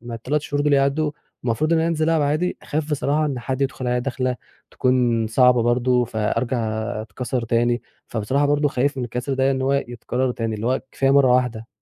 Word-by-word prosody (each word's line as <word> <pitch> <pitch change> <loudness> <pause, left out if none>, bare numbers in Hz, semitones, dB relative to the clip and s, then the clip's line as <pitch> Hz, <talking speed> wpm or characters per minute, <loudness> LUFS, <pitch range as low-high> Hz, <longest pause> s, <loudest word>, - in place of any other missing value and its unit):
ما 120 0 -7
ال3 130 +7 -1
شهور 145 -1 -1
دول 150 - +2
يعدّوا 140 +2 +2 0.3
المفروض 125 +7 +1
إن 165 - +4
أنا 165 +1 +1
أنزِل 160 -2 0
العب 160 -2 +2
عادي، 155 +5 0
خايف 155 +1 -3
بصراحة 150 +1 +1
إن 140 -4 -3
حد 130 +2 -3
يدخُل 135 -1 -2
عليَّ 125 0 +1
دَخلة 130 0 -2 0.3
تكون 120 -3 +1
صعبة 125 +1 +4
برضه 125 +1 +2
فأرجع 115 +3 -1 0.4
أتكسر 120 +3 -4
تاني. 120 +1 +1 0.2
فبصراحة 130 +6 0
برضه 145 0 +2
خايف 140 +2 0
من 125 - -1
الكسر 125 +3 -3
ده 135 +1 +2
إن 130 -1 -1
هو 135 - +1
يتكرر 125 -1 -1
تاني، 115 -2 -3
اللي 110 +2 -4
هو 130 +2 +1
كفاية 135 0 +1
مرّة 135 -2 +5
واحدة. 125 -3 0
130 Hz, 200 wpm, -22 LUFS, 120-140 Hz, 0.4 s, مرّة